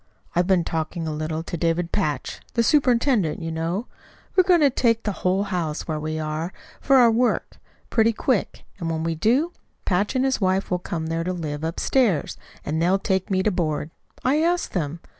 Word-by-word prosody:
"I've 175 +1 +2
been 185 -3 +3
talking 160 +1 -3
a 155 - -2
little 155 +1 -3
to 170 - -5
David 170 +1 0
Patch 150 -9 -2 0.2
the 235 - +3
superintendent, 245 - +2
you 165 -1 -4
know. 165 +7 -2 0.5
We're 370 - +7
going 360 -2 +4
to 285 -2 +5
take 230 -2 +2
the 210 - -1
whole 185 +2 +2
house 175 -6 -3
where 155 -2 -2
we 155 +1 -3
are, 155 +3 -3 0.3
for 275 - +3
our 240 -3 +7
work, 240 +2 0 0.3
pretty 225 0 +4
quick, 230 -1 -1 0.2
and 165 -2 -3
when 160 -1 -2
we 165 0 0
do, 250 - +2 0.3
Patch 200 +6 +1
and 260 +1 +2
his 265 -4 0
wife 190 0 +1
will 180 - +1
come 165 -2 -4
there 165 +1 -1
to 185 +2 -2
live 155 -4 -4
upstairs; 180 - +1 0.3
and 160 +2 -1
they'll 180 +3 +3
take 190 -1 -1
me 190 -1 +1
to 215 - +2
board. 155 -4 -2 0.3
I 285 +4 +3
asked 345 +2 0
them. 165 -2 -2
180 Hz, 195 wpm, -23 LUFS, 160-230 Hz, 0.5 s, We're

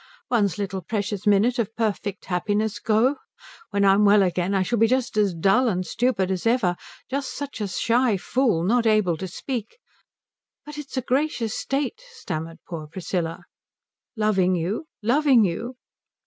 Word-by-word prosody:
One's 205 -7 +2
little 195 -2 -3
precious 205 +1 -3
minute 215 +5 +3
of 225 -1 -2
perfect 210 -2 -2
happiness 205 +3 -1
go? 230 +6 +2 0.5
When 200 0 +1
I'm 195 +1 +5
well 205 0 +6
again 180 +1 0
I 190 - +2
shall 235 +4 -1
be 225 - +5
just 255 0 0
as 205 -4 +2
dull 195 +10 +3
and 185 -3 -1
stupid 220 -5 0
as 190 +3 -1
ever, 225 -7 +2 0.3
just 275 0 -3
such 285 -5 -6
a 205 - -1
shy 230 +3 +1
fool, 220 -4 +1
not 230 +5 +2
able 215 -6 +3
to 190 - -5
speak 235 - -5 0.4
" - - -67
"But 300 0 -8
it's 280 -2 -8
a 260 - 0
gracious 250 -4 0
state" 285 - -2
stammered 165 - -5
poor 160 -3 -6
Priscilla. 170 0 -4 0.7
"Loving 195 -4 +2
you? 190 - -2 0.2
Loving 255 -1 +4
you?" 230 +8 -3
210 Hz, 160 wpm, -24 LUFS, 190-245 Hz, 0.7 s, well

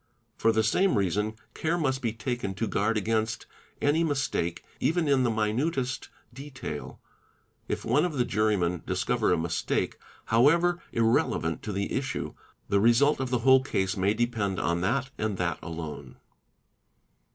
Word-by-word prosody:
For 115 - +3
the 110 0 +2
same 185 - +2
reason 105 +3 0 0.2
care 165 +2 -1
must 135 -5 0
be 115 -4 0
taken 115 -3 -3
to 115 - -1
guard 110 +3 +1
against 110 +1 -1 0.3
any 150 +3 +2
mistake, 135 - -1 0.2
even 165 0 +1
in 140 -2 +3
the 125 - +2
op 110 - -2
inutest 130 +2 -1 0.3
detail; 135 - -7 0.7
if - - -3
one 125 +6 +3
of 180 -3 -1
the 125 -4 +1
jurymen 100 -6 +1
discover 95 +5 +1
a - - +3
mistake, 85 +1 -1 0.3
however 170 +10 +3
"inelevant 115 -7 +1
to 105 - -5
the 100 0 -2
issue; 135 -1 -3 0.3
the 100 - +2
result 120 +8 +4
of 130 -1 -2
the 125 -1 +1
whole 130 0 +7
case 95 -7 -1
may 100 +2 +1
depend 110 -5 -1
on 85 0 0
that 130 +8 0
and 105 -3 -1
that 85 -1 -1
alone. 80 -3 -7
115 Hz, 155 wpm, -28 LUFS, 100-135 Hz, 0.7 s, whole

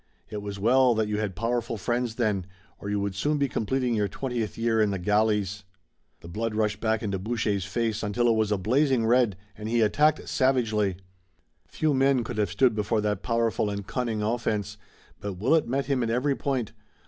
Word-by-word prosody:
It 105 - -4
was 100 -1 -6
well 125 +4 +4
that 110 -1 +1
you 105 0 -1
had 105 -4 -2
powerful 115 +2 -1
friends 120 +3 -1
then, 105 -6 0 0.3
or 100 - -6
you 105 0 0
would 100 -1 -2
soon 145 +10 0
be 140 -1 +1
completing 125 +1 -1
your 105 -2 +1
twentieth 120 0 -4
year 115 -1 +2
in 105 - +3
the 100 - -1
galleys." 105 0 +1 0.6
The - - -11
blood 110 +5 -3
rushed 105 -2 0
back 110 0 0
into 100 -3 -2
Boucher's 105 -2 -1
face 110 +2 -1
until 115 +3 0
it 115 - +4
was 110 -1 +1
a 105 - +2
blazing 125 +4 +2
red, 120 -4 +3 0.2
and 105 0 -6
he 120 0 +2
attacked 150 +8 +2
savagely. 110 -8 +1 0.7
Few 155 -2 0
men 135 -2 +3
could 115 -1 -5
have 105 -3 +1
stood 125 +6 +3
before 105 +1 0
that 105 -2 -1
powerful 115 -2 0
and 100 -1 -4
cunning 115 -2 -2
offense, 105 -2 -1 0.4
but 100 -1 -4
Willet 130 - +2
met 135 +3 -1
him 135 -3 0
at 115 - 0
every 130 +4 +1
point. 130 -7 -2
110 Hz, 195 wpm, -26 LUFS, 105-125 Hz, 0.7 s, well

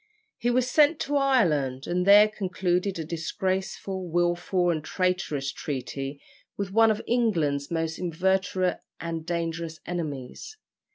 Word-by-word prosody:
He 240 - +1
was 250 0 +2
sent 300 +3 +4
to 290 - -1
Ireland, 155 - +2
and 180 +1 -1
there 205 +1 +9
concluded 185 -2 -1
a 160 - -4
disgraceful, 190 +3 -3
wilful, 175 +1 +1
and 155 -3 -2
traitorous 180 -6 -1
treaty 135 0 -5 0.4
with 200 -1 -3
one 225 +2 +5
of 215 0 0
England's 165 -13 +1
most 165 -1 -2
inveterate 185 +1 0 0.2
and 165 -1 -5
dangerous 165 -1 -3
enemies. 160 - -5
175 Hz, 125 wpm, -26 LUFS, 160-200 Hz, 0.4 s, there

